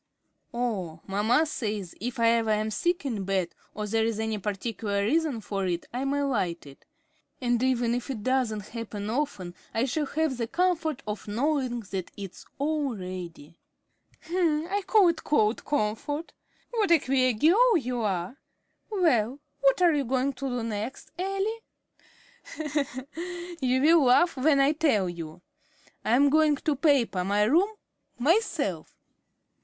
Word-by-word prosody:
"Oh, 195 Hz, -10 st, -3 dB
mamma 220 Hz, +10 st, +2 dB
says 210 Hz, -, -4 dB
if 245 Hz, +2 st, -4 dB
I 230 Hz, 0 st, +5 dB
ever 230 Hz, -1 st, +2 dB
am 215 Hz, 0 st, +1 dB
sick 345 Hz, -, 0 dB
in 225 Hz, -7 st, -2 dB
bed, 190 Hz, -2 st, -1 dB, 0.2 s
or 210 Hz, -, -3 dB
there 220 Hz, +2 st, +1 dB
is 225 Hz, -1 st, -1 dB
any 220 Hz, -1 st, -1 dB
particular 200 Hz, 0 st, -2 dB
reason 295 Hz, -1 st, +1 dB
for 195 Hz, -2 st, -2 dB
it, 175 Hz, -1 st, -2 dB
I 255 Hz, +2 st, -2 dB
may 285 Hz, +1 st, 0 dB
light 190 Hz, -, -1 dB
it. 140 Hz, -1 st, -15 dB, 0.5 s
And 245 Hz, -2 st, +1 dB
even 245 Hz, -2 st, +2 dB
if 245 Hz, +2 st, -3 dB
it 230 Hz, -6 st, -4 dB
doesn't 235 Hz, -5 st, 0 dB
happen 215 Hz, -2 st, -5 dB
often, 225 Hz, -10 st, -2 dB, 0.2 s
I 225 Hz, +3 st, +2 dB
shall 290 Hz, +3 st, -1 dB
have 310 Hz, -4 st, -1 dB
the 230 Hz, -2 st, -2 dB
comfort 330 Hz, -3 st, 0 dB
of 210 Hz, 0 st, -5 dB
knowing 255 Hz, +1 st, 0 dB
that 190 Hz, -2 st, -3 dB
it's 195 Hz, -3 st, -9 dB
all 285 Hz, -3 st, -1 dB
ready." 175 Hz, -4 st, -8 dB, 0.7 s
"I 340 Hz, +2 st, +1 dB
call 410 Hz, -5 st, +6 dB
it 335 Hz, -, -2 dB
cold 220 Hz, -6 st, +2 dB
comfort. 290 Hz, +5 st, -2 dB, 0.4 s
What 440 Hz, -5 st, +1 dB
a 340 Hz, -, +7 dB
queer 255 Hz, -3 st, +2 dB
girl 385 Hz, -, +5 dB
you 250 Hz, -4 st, -2 dB
are! 195 Hz, +3 st, -2 dB, 0.5 s
Well, 280 Hz, -, +2 dB, 0.2 s
what 275 Hz, +6 st, +3 dB
are 345 Hz, -2 st, +6 dB
you 290 Hz, -2 st, +1 dB
going 260 Hz, +3 st, 0 dB
to 265 Hz, +1 st, -4 dB
do 245 Hz, -2 st, -2 dB
next, 225 Hz, +3 st, -5 dB
Elly?" 390 Hz, +4 st, -1 dB, 2.0 s
"You 255 Hz, 0 st, +2 dB
will 315 Hz, 0 st, +6 dB
laugh 295 Hz, +8 st, +4 dB
when 280 Hz, +2 st, +3 dB
I 275 Hz, +1 st, +4 dB
tell 285 Hz, -, +2 dB
you. 170 Hz, 0 st, -7 dB, 0.6 s
I'm 275 Hz, +5 st, +4 dB
going 310 Hz, -1 st, +4 dB
to 300 Hz, +1 st, -1 dB
paper 260 Hz, -, +2 dB
my 205 Hz, +2 st, +2 dB
room 330 Hz, -, +4 dB, 0.5 s
myself." 295 Hz, -, 0 dB
245 Hz, 150 wpm, -27 LUFS, 210-300 Hz, 2.0 s, a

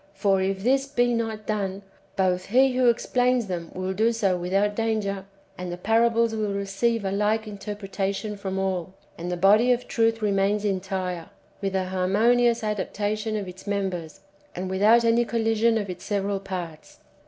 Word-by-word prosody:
For, 195 Hz, -1 st, +2 dB
if 190 Hz, 0 st, -1 dB
this 270 Hz, +3 st, +2 dB
be 245 Hz, -3 st, +1 dB
not 225 Hz, -2 st, -2 dB
done, 200 Hz, -2 st, -2 dB, 0.3 s
both 185 Hz, -1 st, +1 dB
he 260 Hz, +4 st, +4 dB
who 250 Hz, -1 st, +4 dB
explains 245 Hz, +1 st, +1 dB
them 175 Hz, -3 st, -5 dB
will 185 Hz, +1 st, -2 dB
do 220 Hz, +4 st, +2 dB
so 205 Hz, -5 st, +1 dB
without 195 Hz, +4 st, 0 dB
danger, 210 Hz, -4 st, -1 dB, 0.3 s
and 180 Hz, -1 st, -4 dB
the 175 Hz, -, -5 dB
parables 230 Hz, +3 st, +2 dB
will 215 Hz, -2 st, -1 dB
receive 200 Hz, +3 st, 0 dB
a 190 Hz, -, -1 dB
like 210 Hz, +2 st, +1 dB
interpretation 205 Hz, 0 st, -4 dB
from 190 Hz, -1 st, -4 dB
all, 190 Hz, -1 st, -2 dB, 0.2 s
and 175 Hz, +2 st, -5 dB
the 175 Hz, -, -2 dB
body^ 210 Hz, +7 st, +5 dB
of 245 Hz, -, -10 dB
truth 225 Hz, -1 st, +1 dB
remains 205 Hz, 0 st, +1 dB
entire, 185 Hz, -2 st, -2 dB, 0.3 s
with 195 Hz, -1 st, -2 dB
a 190 Hz, -1 st, +1 dB
harmonious 230 Hz, +6 st, +2 dB
adaptation 210 Hz, +1 st, -2 dB
of 200 Hz, -2 st, -4 dB
its 180 Hz, +3 st, -11 dB
members, 190 Hz, -6 st, -3 dB, 0.3 s
and 185 Hz, +1 st, -4 dB
without 215 Hz, +5 st, +4 dB
any 230 Hz, +1 st, +4 dB
collision 225 Hz, 0 st, +1 dB
[of 205 Hz, -2 st, -2 dB
its 180 Hz, -1 st, -7 dB
several 200 Hz, -1 st, -1 dB
parts]. 180 Hz, -5 st, -7 dB
205 Hz, 165 wpm, -25 LUFS, 190-225 Hz, 0.3 s, body^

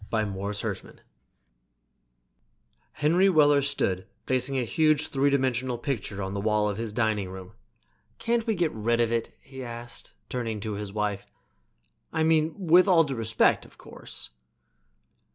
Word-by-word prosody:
By 110 Hz, -1 st, +1 dB
Morris 100 Hz, +1 st, -3 dB
Hershman -, -, -5 dB, 2.0 s
Henry 175 Hz, +6 st, +3 dB
Weller 145 Hz, -4 st, +5 dB
stood 95 Hz, -10 st, 0 dB, 0.2 s
facing 130 Hz, +1 st, +1 dB
a 130 Hz, -, +1 dB
huge 155 Hz, +3 st, +2 dB
three 140 Hz, -1 st, +2 dB
dimensional 130 Hz, -2 st, 0 dB
picture 115 Hz, -6 st, -3 dB
on 95 Hz, 0 st, -4 dB
the 100 Hz, -, -2 dB
wall 105 Hz, 0 st, +2 dB
of 105 Hz, 0 st, -3 dB
his 115 Hz, -2 st, -3 dB
dining 105 Hz, -4 st, 0 dB
room. 95 Hz, 0 st, -9 dB, 0.7 s
"Can't 235 Hz, 0 st, 0 dB
we 220 Hz, -, +1 dB
get 170 Hz, -4 st, +1 dB
rid 115 Hz, +2 st, 0 dB
of 115 Hz, -1 st, +2 dB
it?" 115 Hz, -1 st, -1 dB
he 135 Hz, -1 st, -9 dB
asked, 120 Hz, 0 st, -7 dB
turning 115 Hz, -4 st, -3 dB
to 110 Hz, 0 st, -3 dB
his 100 Hz, -1 st, -5 dB
wife. 105 Hz, -1 st, -2 dB, 0.8 s
"I 160 Hz, -1 st, 0 dB
mean, 160 Hz, 0 st, +2 dB
with 180 Hz, 0 st, +5 dB
all 175 Hz, -4 st, +6 dB
due 140 Hz, -3 st, -3 dB
respect, 115 Hz, -2 st, +2 dB
of -, -, -18 dB
course." -, -, -10 dB
120 Hz, 150 wpm, -27 LUFS, 105-150 Hz, 2.0 s, all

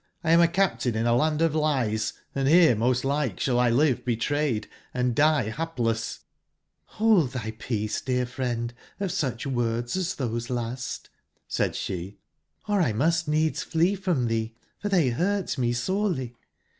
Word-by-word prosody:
1 165 Hz, -1 st, +3 dB
am 170 Hz, -, +7 dB
a 170 Hz, -, +6 dB
captive 170 Hz, -, 0 dB
in 110 Hz, +1 st, 0 dB
a 120 Hz, 0 st, +3 dB
land 155 Hz, +5 st, +2 dB
of 165 Hz, -2 st, +2 dB
lies, 130 Hz, -9 st, 0 dB
& -, -, -43 dB
bere 155 Hz, +3 st, +5 dB
most 125 Hz, +4 st, +1 dB
like 140 Hz, -6 st, 0 dB
sballl 125 Hz, -2 st, +2 dB
live 130 Hz, +1 st, +2 dB
betrayedand 125 Hz, -1 st, -1 dB
die 145 Hz, -4 st, +3 dB
bapless/' 115 Hz, -9 st, -2 dB, 0.7 s
''Hold 210 Hz, -, +4 dB
tby 110 Hz, -3 st, -5 dB
peace, 110 Hz, -3 st, -2 dB
dear 125 Hz, -1 st, 0 dB
friend, 120 Hz, -2 st, -3 dB, 0.3 s
of 195 Hz, -3 st, -1 dB
sucbwordsastbose 120 Hz, -2 st, -2 dB
last,'' 125 Hz, +1 st, -4 dB, 0.4 s
said -, -, 0 dB
sbe, 95 Hz, +2 st, -4 dB, 0.5 s
'*or 205 Hz, -1 st, +2 dB
1 115 Hz, -10 st, +1 dB
must 165 Hz, +4 st, +2 dB
needs 155 Hz, +1 st, +1 dB
flee 170 Hz, +4 st, +1 dB
from 180 Hz, -11 st, 0 dB
tbee, 115 Hz, 0 st, -2 dB, 0.2 s
for 205 Hz, -, -3 dB
tbey 160 Hz, -11 st, +2 dB
burt 195 Hz, +5 st, 0 dB
me 120 Hz, -1 st, +1 dB
sorely. 130 Hz, -, -1 dB
130 Hz, 145 wpm, -26 LUFS, 120-165 Hz, 0.7 s, am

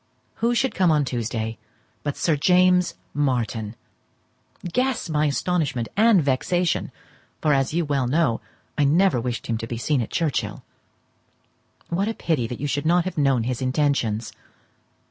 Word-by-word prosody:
Who 235 Hz, +1 st, +1 dB
should 265 Hz, +2 st, +1 dB
come 185 Hz, -2 st, +3 dB
on 150 Hz, -2 st, +3 dB
Tuesday 115 Hz, -2 st, -3 dB, 0.4 s
but 145 Hz, -1 st, -3 dB
Sir 165 Hz, -, +2 dB
James 180 Hz, +2 st, +3 dB, 0.2 s
Martin! 120 Hz, -6 st, -1 dB, 1.0 s
Guess 255 Hz, -8 st, 0 dB
my 150 Hz, 0 st, +2 dB
astonishment, 145 Hz, -5 st, -1 dB
and 215 Hz, -5 st, +5 dB
vexation—for, 155 Hz, +1 st, -1 dB
as 135 Hz, -1 st, +1 dB
you 170 Hz, -1 st, +1 dB
well 140 Hz, -4 st, 0 dB
know, 140 Hz, -4 st, +1 dB, 0.4 s
I -, -, +4 dB
never 155 Hz, -1 st, +3 dB
wished 120 Hz, 0 st, -3 dB
him 115 Hz, -1 st, -2 dB
to 115 Hz, -, -5 dB
be 115 Hz, -, -4 dB
seen 135 Hz, +3 st, 0 dB
at 115 Hz, -, -4 dB
Churchhill. 160 Hz, -5 st, -2 dB, 1.3 s
What 190 Hz, +4 st, 0 dB
a 225 Hz, -, -2 dB
pity 145 Hz, -9 st, -1 dB
that 120 Hz, -, -6 dB
you 145 Hz, -, -3 dB
should 145 Hz, +2 st, -1 dB
not 175 Hz, +1 st, +3 dB
have 185 Hz, -4 st, -3 dB
known 135 Hz, -5 st, +2 dB
his 125 Hz, +1 st, -3 dB
intentions! 130 Hz, -5 st, 0 dB
145 Hz, 150 wpm, -23 LUFS, 125-175 Hz, 1.3 s, and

